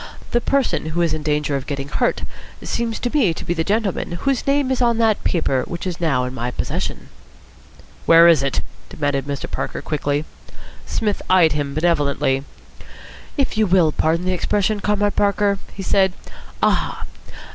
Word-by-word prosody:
The 240 - +2
person 275 - 0
who 165 +2 -1
is 170 - +1
in 155 - -3
danger 150 -1 0
of 135 -1 -4
getting 140 -1 -4
hurt 140 - 0 0.4
seems 230 -1 -2
to 245 +4 -3
me 205 - +3
to - - -7
be 175 - 0
the 165 -1 -1
gentleman 200 -2 -1
whose 270 +9 -1
name 280 -1 +2
is 260 - 0
on 235 -2 +3
that 225 -2 +2
paper 140 -7 +1
which 170 +1 -5
is 180 -3 -4
now 140 -7 +1
in 125 0 -4
my 125 -1 -3
possession." - - -4 1.0
"Where 165 +1 +8
is 165 -5 +6
it?" 140 -1 0 0.3
demanded 145 -2 -1
Mr. 140 -1 -3
Parker - - -3
quickly. 145 0 -1 0.6
Psmith 210 -2 -1
eyed 180 -4 +5
him 145 -2 -2
benevolently. 145 -4 +1 0.9
"If 270 -6 0
you 215 - +3
will 180 -4 +4
pardon 165 +3 0
the 185 - +1
expression, 205 +3 0
Comrade 205 0 0
Parker," 200 -1 +2
he 195 - -7
said, 190 -1 +3 0.5
"'Aha!' - - +1
175 Hz, 170 wpm, -20 LUFS, 150-210 Hz, 1.0 s, Where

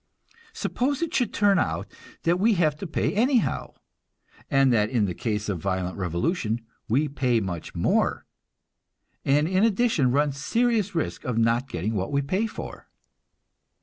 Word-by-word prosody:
Suppose 285 - -1
it 335 - -3
should 245 -5 +1
turn 200 -2 +3
out - - -1 0.4
that 175 +2 +2
we 220 +2 +4
have 155 -4 +2
to 195 - -6
pay 160 - -1
anyhow, 240 +3 +1 0.7
and 135 -2 +4
that 105 -2 +2
in 115 -5 +1
the 90 - -2
case 105 +2 -2
of 100 -5 -2
violent 95 0 -2
revolution 105 - -1 0.3
we 140 +7 +2
pay 130 -4 +1
much 90 -5 -5
more, - - +1 1.0
and 145 +3 +3
in 190 +3 +2
addition 220 - +3
run 145 +2 +2
serious 215 - 0
risk 160 - -2
of 125 -5 -2
not 115 +3 +2
getting 100 +2 -2
what 95 +2 -2
we 140 0 +1
pay 190 +10 0
for? - - -8
140 Hz, 155 wpm, -25 LUFS, -, 1.0 s, we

